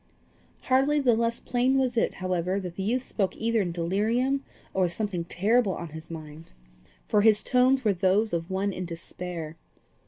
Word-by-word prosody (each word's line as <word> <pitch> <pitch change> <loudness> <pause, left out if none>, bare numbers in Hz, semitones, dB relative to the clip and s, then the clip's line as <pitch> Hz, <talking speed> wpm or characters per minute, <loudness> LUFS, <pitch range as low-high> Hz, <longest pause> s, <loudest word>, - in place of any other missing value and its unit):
Hardly 270 +3 +3
the 255 -4 +4
less 230 +1 0
plain 255 +2 +1
was 255 -2 +1
it, 230 - +1
however, 185 +1 -1
that 180 -3 -6
the 195 - -4
youth 240 +6 0
spoke 195 -7 -2
either 230 -1 +1
in 180 -3 -2
delirium 220 +11 0 0.3
or 190 -1 +2
with 175 - -3
something 195 -5 -3
terrible 205 +3 +2
on 170 - -6
his 160 +1 -10
mind, 155 -1 -9 0.6
for 210 - +3
his 215 -1 +4
tones 255 0 +3
were 210 - +4
those 195 +4 +2
of 165 +1 -2
one 195 +1 -1
in 185 - -4
despair. 170 -1 -6
200 Hz, 180 wpm, -27 LUFS, 175-240 Hz, 0.6 s, the